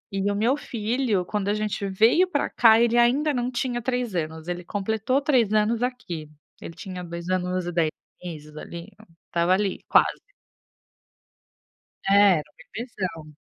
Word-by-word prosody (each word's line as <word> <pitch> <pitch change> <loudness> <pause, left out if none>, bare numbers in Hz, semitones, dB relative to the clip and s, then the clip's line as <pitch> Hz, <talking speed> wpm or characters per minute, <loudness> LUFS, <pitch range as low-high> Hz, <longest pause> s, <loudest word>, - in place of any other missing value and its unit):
E 195 +1 0
o - - -2
meu 235 +6 +2
filho, 225 -5 -1
quando 205 +1 -2
a - - +2
gente 210 -1 -2
veio 225 - +4
para 290 -5 0
cá, 225 -1 +6
ele 235 0 +3
ainda 270 +6 +3
não 245 -1 -1
tinha 245 -1 -2
3 245 -4 -2
anos, 160 -1 -4
ele 175 0 -4
completou 220 +7 -1
3 255 -8 +2
anos 220 +2 +2
aqui. 180 -12 -4 0.3
Ele 165 - -8
tinha 185 -2 -7
2 170 +1 -7
anos 185 0 -1
e 175 - -3
10 165 -2 +1 0.3
meses 150 -3 -8
ali, 170 +2 -8 0.4
estava 170 +1 +2
ali 195 0 0
quase. - - +3 1.9
É, 200 -4 +6
era - - -6
um - - -66 0.2
bebezão. 180 - -5
205 Hz, 160 wpm, -25 LUFS, 175-240 Hz, 1.9 s, cá